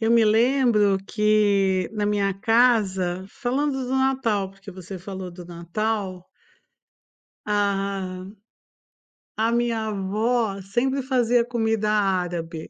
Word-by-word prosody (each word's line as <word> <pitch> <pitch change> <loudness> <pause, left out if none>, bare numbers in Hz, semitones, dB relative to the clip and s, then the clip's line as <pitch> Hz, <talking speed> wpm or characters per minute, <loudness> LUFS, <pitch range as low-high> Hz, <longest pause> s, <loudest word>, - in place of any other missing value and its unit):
eu 225 0 +1
me 230 -1 +5
lembro 225 -3 +3
que 205 -3 +2
na 210 -1 -1
minha 200 -1 +1
casa, 195 -5 +2
falando 280 +6 -1
do 260 +1 -1
Natal, 250 -7 +1
porque 195 +1 -13
você 185 +1 -9
falou 190 0 -7
do 175 0 -11
Natal. 185 +2 -3 1.2
Aham, 195 -2 -2 1.0
a 225 +1 +1
minha 235 -2 0
avó 210 +1 -1
sempre 250 +8 -1
fazia 245 -2 +2
comida 225 -3 0
árabe. 180 -5 -1
210 Hz, 110 wpm, -24 LUFS, 190-230 Hz, 1.2 s, me